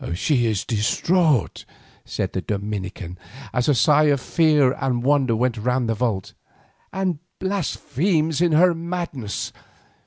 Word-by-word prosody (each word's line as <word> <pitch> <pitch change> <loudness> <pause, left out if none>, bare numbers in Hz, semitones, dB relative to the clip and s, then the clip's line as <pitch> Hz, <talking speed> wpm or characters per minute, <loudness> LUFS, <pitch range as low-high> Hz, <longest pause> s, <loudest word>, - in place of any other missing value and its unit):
"She 120 - +1
is 105 -4 -1
distraught," 140 - +1 0.4
said - - -3
the - - -2
Dominican 95 -3 -5 0.3
as 125 +2 +1
a 145 - +4
sigh 150 +4 +4
of 145 -2 +3
fear 150 -2 +3
and 125 -2 -2
wonder 135 -3 +2
went 120 +1 0
round 125 +2 0
the 115 - +1
vault, 110 -5 -2 0.6
"and 185 -5 -2 0.2
blasphemes 165 -3 -1
in 175 -2 +3
her 175 +3 +5
madness. 165 - -4
135 Hz, 130 wpm, -22 LUFS, 115-160 Hz, 0.6 s, her